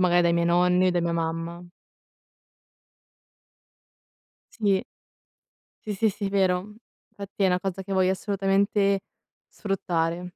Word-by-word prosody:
magari 175 -1 +4
dai 170 0 +3
miei 170 0 +1
nonni 180 +1 +3
o 185 - +4
da 175 - 0
mia 170 0 0
mamma. 165 +1 -4 2.9
Sì. 195 -3 +2 1.0
Sì, 210 - -1
sì, 220 +2 +2
sì, 200 0 -4
vero 190 +1 0 0.4
fatti 200 -1 -5
è - - +5
una 180 -1 +2
cosa 190 0 -4
che 195 +1 -5
voglio 185 -1 +3
assolutamente 195 0 +1 0.5
sfruttare. 175 -4 -2
185 Hz, 120 wpm, -25 LUFS, 175-195 Hz, 2.9 s, è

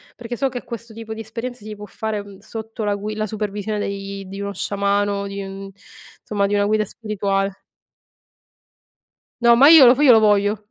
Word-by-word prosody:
perché 240 0 -6
so 270 +3 0
che 245 -1 -6
questo 235 -1 -8
tipo 220 0 -7
di 220 - -7
esperienza 230 +1 -7
si 215 0 -7
può 210 0 -9
fare, 220 +1 -4
ehm, 200 -1 -8
sotto 220 +1 -7
la 205 -1 0
gui 210 +1 -5
la 215 0 -2
supervisione 210 0 -3
dei 200 -1 -5
di 195 +1 -7
uno 200 0 -4
sciamano, 200 +1 -1
di 200 0 -5
un 195 0 -8 0.5
insomma 200 -2 0
di 205 - 0
una 205 0 +2
guida 215 +1 +2
spirituale. 200 -2 -3 1.8
No, 235 0 +6
ma 270 +4 +7
io 320 -5 +10
lo 245 - +8
f - - -2
io 265 - +8
lo 225 - +7
voglio. 210 0 +2
210 Hz, 195 wpm, -21 LUFS, 200-225 Hz, 1.8 s, io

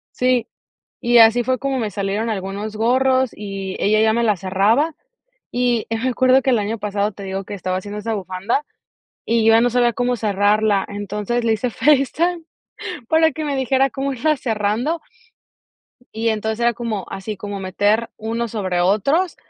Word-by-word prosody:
Sí, 250 -2 +1 0.6
y 240 0 +4
así 230 +1 +6
fue 255 +1 0
como 275 0 -2
me 220 -4 -2
salieron 205 +3 -2
algunos 205 +1 -4
gorros 260 +3 +2
y 195 -2 -6
ella 215 +1 +2
ya 220 0 +3
me 235 - +1
la 210 -4 +2
cerraba, 205 - +1 0.6
y 245 -2 +1
me 225 +3 -1
acuerdo 255 +1 +4
que 265 - -3
el 240 - +3
año 215 +2 -2
pasado, 205 0 -1
te 200 - -11
digo 195 0 -4
que - - -9
estaba 185 -1 -3
haciendo 205 +2 -7
esa 225 +1 -3
bufanda, 195 +7 -2 0.6
y 230 0 +2
yo 225 - +6
ya 225 - +6
no 245 - +3
sabía 240 0 +2
cómo 245 +2 0
cerrarla, 205 -1 +2
entonces 210 +3 -3
le 230 - +2
hice 230 +3 -1
FaceTime 300 +7 +1 0.7
para 320 0 +4
que 310 +3 -5
me 285 -2 -1
dijera 265 +1 +2
cómo 275 +1 -3
irla 305 +4 +1
cerrando, 230 +8 -1 1.1
y 225 +1 -1
entonces 220 +1 -2
era 235 0 +2
como 225 -5 -4
así 195 +2 -5
como 205 +1 -6
meter 205 +4 +1
uno 230 +2 -2
sobre 190 -5 -2
otros, 275 - +1
225 Hz, 175 wpm, -20 LUFS, 205-250 Hz, 1.1 s, así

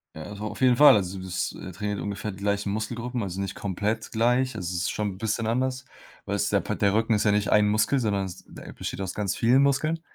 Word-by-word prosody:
Ja, 80 - -7
also, 105 +1 -8
auf 105 +3 -6
jeden 125 -1 +5
Fall. 150 -3 +9
Also, 95 -2 -1
das, 95 -1 -3
äh, 95 - -8
trainiert 105 +3 -3
ungefähr 100 +1 -4
die 95 - -11
gleichen 100 0 -1
Muskelgruppen, 115 +2 -3
also, 95 0 -4
nicht 95 - -4
komplett 105 +3 -2
gleich. 125 +2 +1
Also, 90 -5 -4
es 85 - -1
ist - - 0
schon 105 -2 -2
'n - - -13
bisschen 110 +1 -1
anders, 130 +2 -1 0.4
weil's - - 0
der - - +3
Pa - - -3
der 100 0 +2
Rücken 115 +1 +2
ist 105 - +1
ja 105 - +3
nicht 105 0 +1
1 105 -1 +5
Muskel, 110 +6 +2
sondern 100 -4 0
es 90 -2 -9
der - - -11
besteht - - -5
aus 95 -2 -4
ganz 100 -3 -1
vielen 125 +4 +4
Muskeln. 155 +4 +1
105 Hz, 250 wpm, -26 LUFS, 100-120 Hz, 0.4 s, Fall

